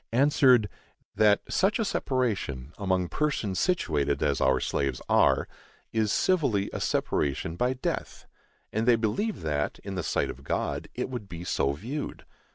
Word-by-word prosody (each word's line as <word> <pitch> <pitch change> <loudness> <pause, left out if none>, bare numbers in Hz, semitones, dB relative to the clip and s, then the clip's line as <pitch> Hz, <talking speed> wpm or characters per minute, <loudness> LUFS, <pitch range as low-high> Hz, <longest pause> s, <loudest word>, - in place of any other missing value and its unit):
answered, 130 -3 +5 0.5
That 105 -1 +4
such 195 +3 +2
a 225 - 0
separation, 100 - -1
among 95 -3 +1
persons 140 -11 -1
situated 75 - +1
as 70 - +1
our 65 -1 +3
slaves 70 -3 -1
are, - - +3 0.5
is 110 -2 +1
civilly 130 - +1
a - - -4
separation 75 +3 -1
by 125 +7 +1
death, 130 - -4 0.5
and 110 +2 0
they 120 - +7
believe 120 - -1
that, 75 -2 -1
in 100 - -5
the 95 - -2
sight - - 0
of 70 - -13
God, - - -2
it - - -3
would 120 -6 -6
be 85 0 -7
so 70 -5 0
viewed. 125 - -5
105 Hz, 155 wpm, -28 LUFS, -, 0.5 s, they